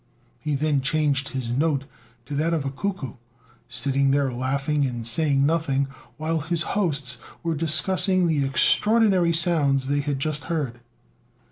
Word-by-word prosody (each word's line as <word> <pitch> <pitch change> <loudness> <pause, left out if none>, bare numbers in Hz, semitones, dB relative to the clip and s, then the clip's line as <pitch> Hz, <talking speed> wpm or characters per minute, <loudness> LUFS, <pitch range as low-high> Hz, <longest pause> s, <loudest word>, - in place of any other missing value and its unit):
He 150 -2 -2
then 145 -1 +1
changed 140 -1 0
his 130 -3 -4
note 140 +1 0 0.4
to 145 - -7
that 160 +4 0
of 150 -4 -2
a 135 - -2
cuckoo, 145 - -4 0.5
sitting 135 +2 +1
there 135 -2 +1
laughing 140 +4 -1
and 120 -4 -3
saying 140 +3 +2
nothing, 140 -4 0 0.3
while 160 +1 -1
his 165 +2 -1
hosts 140 - 0 0.2
were 165 -1 0
discussing 180 +4 +2
the 155 -4 +1
extraordinary 190 +5 +3
sounds 155 -6 +2
they 145 +2 0
had 145 -1 -2
just 150 +1 -2
heard. 140 -8 -3
145 Hz, 145 wpm, -24 LUFS, 135-165 Hz, 0.5 s, extraordinary